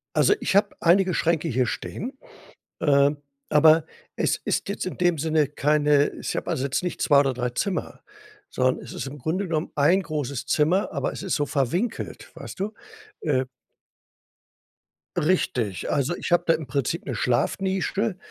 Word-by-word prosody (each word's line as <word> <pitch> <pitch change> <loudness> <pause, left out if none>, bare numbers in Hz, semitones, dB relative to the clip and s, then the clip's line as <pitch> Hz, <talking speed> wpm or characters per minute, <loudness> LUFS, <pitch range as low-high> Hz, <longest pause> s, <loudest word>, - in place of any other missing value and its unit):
Also, - - +5
ich - - -1
habe 205 0 +3
einige 180 +1 +4
Schränke 165 -1 +1
hier 130 -3 +1
stehen, 255 - -5 0.6
äh, 140 -2 +4 0.4
aber 155 +1 +6 0.3
es - - +1
ist - - -1
jetzt 200 - -3
in 185 - -5
dem 175 -2 +2
Sinne 155 0 +1
keine 150 0 +2
ich - - -3
habe - - -3
also, 135 - -1
jetzt 140 +5 -1
nicht 180 - -4
2 140 -1 +5
oder 135 -2 +2
3 125 0 -2
Zimmer, 185 +9 -3 0.5
sondern 130 0 0
es - - -9
ist - - -5
im 145 +2 -8
Grunde 170 +9 -2
genommen, 160 -1 -2
1 170 +7 +4
großes 140 -6 -4
Zimmer, 160 +8 +2
aber - - -2
es - - -7
ist 190 - 0
so 145 - 0
verwinkelt, 170 - -2
weißt - - -9
du, 210 +3 -2 0.5
äh. 130 -4 +1 1.7
Richtig, 125 - 0
also, 145 +5 0
ich - - -5
habe 175 - +4
da 165 - +4
im 155 -3 -4
Prinzip 140 +4 -2
'ne 130 - -3
Schlafnische 190 - 0
155 Hz, 165 wpm, -25 LUFS, 140-180 Hz, 1.7 s, aber